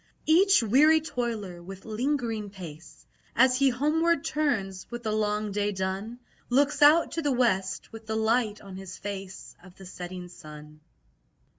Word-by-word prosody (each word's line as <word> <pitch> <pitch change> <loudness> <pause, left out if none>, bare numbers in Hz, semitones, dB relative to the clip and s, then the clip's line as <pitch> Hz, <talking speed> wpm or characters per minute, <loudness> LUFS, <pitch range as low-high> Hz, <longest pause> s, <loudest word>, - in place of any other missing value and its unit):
Each 370 - +5
weary 295 +9 +5
toiler, 230 - -4
with 195 +2 -10
lingering 225 -2 -2
pace, 170 -5 -11 0.3
As 255 +1 +5
he 275 0 +4
homeward 305 +5 +1
turns, 210 -12 -1
with 240 0 -7
the 215 - -1
long 210 0 -1
day 205 +1 0
done, 190 +4 -4 0.3
Looks 280 +4 +2
out 300 +3 +6
to 330 - -2
the 290 -2 0
west, 195 -7 0
with 225 -1 -11
the 220 - -2
light 220 -1 +1
on 195 -2 -10
his 190 -1 -8
face 195 -2 -7
Of 185 -1 -15
the 195 - -13
setting 180 0 -7
sun. 150 -3 -12
215 Hz, 155 wpm, -27 LUFS, 190-260 Hz, 0.3 s, out